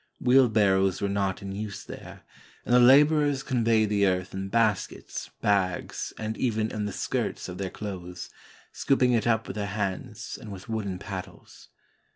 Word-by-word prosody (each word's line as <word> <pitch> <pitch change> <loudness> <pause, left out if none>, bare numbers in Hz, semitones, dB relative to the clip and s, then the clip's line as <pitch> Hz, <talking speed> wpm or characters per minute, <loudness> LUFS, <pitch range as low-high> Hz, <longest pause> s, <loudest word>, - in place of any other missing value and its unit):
Wheelbarrows 105 -7 +4
were 100 - 0
not 100 -1 -1
in 100 - -5
use 100 0 -5
there, - - -10 0.4
and - - 0
the 125 - +7
laborers 145 +2 +5
conveyed 115 -3 +2
the 100 -1 +3
earth 90 0 -1
in 95 0 -4
baskets, 110 -2 -1
bags, 95 -3 0
and 110 0 -3
even 110 -3 0
in 105 -1 -3
the 105 - -3
skirts - - -2
of 90 0 -7
their 95 -1 -2
clothes, 90 -4 -7 0.4
scooping 130 -2 +2
it 115 0 +1
up 110 -1 +2
with - - -7
their 100 -1 -2
hands 105 +2 -4
and 105 - -9
with 95 -1 -9
wooden 105 -5 -3
pad 95 -1 -5
dles. - - -17
105 Hz, 170 wpm, -27 LUFS, 95-115 Hz, 0.4 s, the